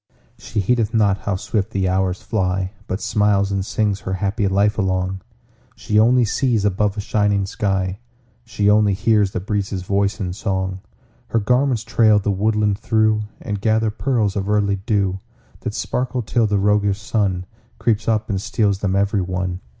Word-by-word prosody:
She 110 -1 -2
heedeth 115 +2 0
not 100 -3 +3
how 100 - -2
swift 105 +1 -2
the 95 -3 -1
hours 95 0 0
fly, 95 -3 -1 0.2
But 95 - -3
smiles 100 -1 +1
and 100 -1 -1
sings 105 -1 -1
her 95 +1 -4
happy 100 +2 -1
life 100 +3 +2
along; 95 -1 -1 0.5
She 105 -2 +1
only 120 +2 +4
sees 115 -2 +1
above 105 +1 0
a - - -2
shining 100 -1 +1
sky; 95 -1 -1 0.4
She 105 -3 -1
only 105 -1 +4
hears 105 -1 +2
the 95 - -3
breezes' 100 -1 -3
voice 100 +2 0
in 90 -3 -3
song. 95 -2 -2 0.5
Her 115 - +1
garments 125 +1 +1
trail 110 -1 +4
the 105 0 0
woodland 105 0 +1
through, 110 -1 +1
And 105 -3 -4
gather 110 0 +2
pearls 110 -4 0
of 100 0 -2
early 100 -1 +2
dew 95 -2 -1 0.4
That - - -5
sparkle 125 0 -2
till 115 +1 +1
the 105 -1 +1
roguish 100 0 +2
Sun 100 -4 -1 0.3
Creeps 110 -2 0
up 110 -1 +1
and 95 -5 -2
steals 105 -2 0
them 95 -2 0
every 100 0 +1
one. 90 0 -3
100 Hz, 170 wpm, -20 LUFS, 95-110 Hz, 0.5 s, only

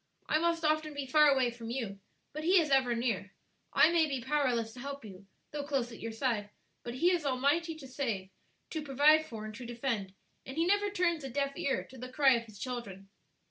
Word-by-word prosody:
I 310 - +2
must 335 0 +1
often 310 -1 +1
be 285 -1 -3
far 300 +3 +5
away 265 -4 +3
from 230 -1 -8
you, 230 -6 -4 0.3
but 305 +1 -5
He 365 +3 +5
is 305 -4 0
ever 260 -3 +3
near; 225 -4 -2 0.4
I 320 - +6
may 330 -2 +4
be 275 -3 -2
powerless 245 -4 0
to 250 - -11
help 280 0 -6
you, 195 -1 -12 0.2
though 295 - -3
close 270 -4 -1
at 230 - -10
your 230 - -4
side, 225 -3 -1 0.3
but 240 0 -6
He 345 +8 +3
is 350 -3 +1
almighty 285 +5 +1
to 290 -4 -10
save, 230 -8 -3 0.4
to 315 - -2
provide 300 +2 +4
for, 220 -2 -7
and 215 - -7
to 240 +4 -8
defend; 235 -5 -3 0.3
and 265 +3 -8
He 330 - +3
never 405 +2 +2
turns 350 -5 0
a 270 - -5
deaf 275 +2 -1
ear 275 - -1
to 260 - -14
the 255 +1 -6
cry 270 -1 +5
of 235 -1 -1
His 215 -2 -13
children." 200 -6 -6
265 Hz, 220 wpm, -32 LUFS, 235-305 Hz, 0.4 s, I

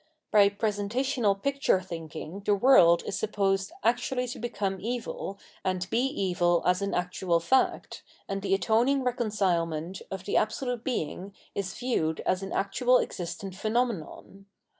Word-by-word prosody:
By 205 -2 +6
presentational 210 +1 0
picture 275 -6 +2
thinking 165 0 -7
the 205 0 +3
world 185 -7 +6
is - - -3
supposed 195 -2 0
actually 250 +2 +1
to - - -6
become 200 -5 -2
evil 225 -3 -4 0.3
and 185 -1 -1
be 230 - +2
evil 180 - +1
as 180 +1 +2
an 200 0 -1
actual 180 -1 0
fact, 260 +11 +1 0.3
and 195 0 -3
the 195 0 +2
atoning 235 +7 +2
reconcilement 190 -8 -1
of 190 -1 -5
the - - +1
Absolute 240 +2 -1
Being 195 - -3 0.2
is 195 -1 -3
viewed 165 -11 0
as 185 - 0
an 195 - -6
actual 245 +6 +2
existent 180 0 -4
phenomenon. 200 -3 -3
200 Hz, 140 wpm, -28 LUFS, 185-240 Hz, 0.3 s, By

